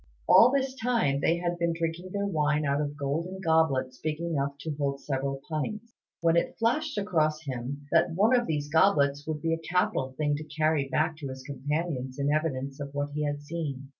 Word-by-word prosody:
All 245 - +8
this 270 -1 0
time 230 - +1
they 165 - +3
had 175 0 -2
been 170 0 +1
drinking 165 +2 -3
their 200 +1 -1
wine 150 -5 +1
out 140 +1 +1
of 145 0 -3
golden 160 +6 -2
goblets 160 -7 +1
big 155 0 -2
enough 145 -5 -1
to 160 - -3
hold 140 -1 -1
several 135 -1 -3
pints, 215 +9 -4 0.3
when 165 0 +3
it 170 - +1
flashed 255 +5 0
across 155 -6 +1
him 135 +1 -5
that - - +4
one 215 +7 +4
of 240 -1 +1
these 150 -2 -1
goblets 145 -3 +3
would 155 -2 -3
be 165 0 +1
a 165 - -1
capital 160 -6 0
thing 145 -1 +1
to 155 - -6
carry 155 -2 0
back 155 +2 +1
to 145 -3 -6
his 130 0 -7
companions 140 -1 -3
in 140 0 +1
evidence 140 -3 -2
of 140 0 -6
what 145 0 -2
he 150 0 -1
had 145 0 -3
seen. 145 -4 -5
155 Hz, 200 wpm, -28 LUFS, 140-170 Hz, 0.3 s, All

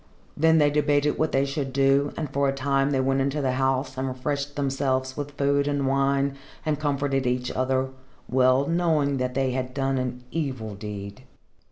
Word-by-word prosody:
Then 160 +1 +4
they 145 -2 +4
debated 145 0 +2
what 155 - +1
they 135 +1 +2
should 140 -1 -3
do, 135 +1 +3
and 155 - -2
for 140 0 +2
a - - 0
time 135 0 +1
they 135 -2 +1
went 135 +1 +1
into 140 +2 0
the 135 -3 +1
house 130 0 0
and 135 - -1
refreshed 140 +2 -3
themselves 130 -2 -1
with 145 0 -6
food 140 0 +2
and 145 -1 0
wine, 140 +1 +1 0.3
and 150 -2 0
comforted 140 -3 0
each 125 0 -1
other, 130 +1 0 0.4
well 130 +1 +3
knowing 160 -4 +1
that 125 -1 -2
they 135 -1 +1
had 130 0 -3
done 135 -1 0
an 125 -1 -4
evil 130 -9 -3
deed. 100 +3 -7
135 Hz, 185 wpm, -25 LUFS, 130-145 Hz, 0.4 s, Then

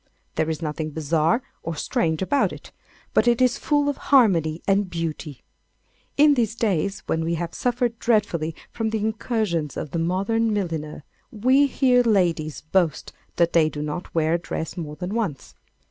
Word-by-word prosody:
There 160 0 0
is 160 +1 -3
nothing 155 0 -3
bizarre 160 - +1 0.2
or 165 0 -4
strange 160 +3 0
about 280 +9 +1
it, - - -11 0.4
but 230 - +3
it 235 -1 +4
is 255 -2 +2
full 290 -1 +1
of 285 - -1
harmony 175 - +4
and 195 -1 +2
beauty. 160 -5 -5 0.7
In 295 0 +6
these 230 -5 0
days, 200 -4 0
when 160 - -1
we 170 +1 -1
have 170 0 -4
suffered 245 -1 -1
dreadfully 170 -9 +1 0.2
from 225 -1 -2
the 220 - -1
incursions 215 - -1
of 155 - -5
the 170 - -2
modern 200 +7 0
milliner, 165 -7 -3 0.3
we 260 +6 +3
hear 255 -2 +3
ladies 170 - +1
boast 160 -3 0 0.2
that 170 0 +2
they 160 -2 +4
do 150 -1 -5
not 150 +5 -5
wear 160 0 +2
a 170 - +1
dress 160 -1 -5
more 150 -4 -6
than 180 +4 -5
once. 200 - -3
175 Hz, 170 wpm, -23 LUFS, 160-225 Hz, 0.7 s, In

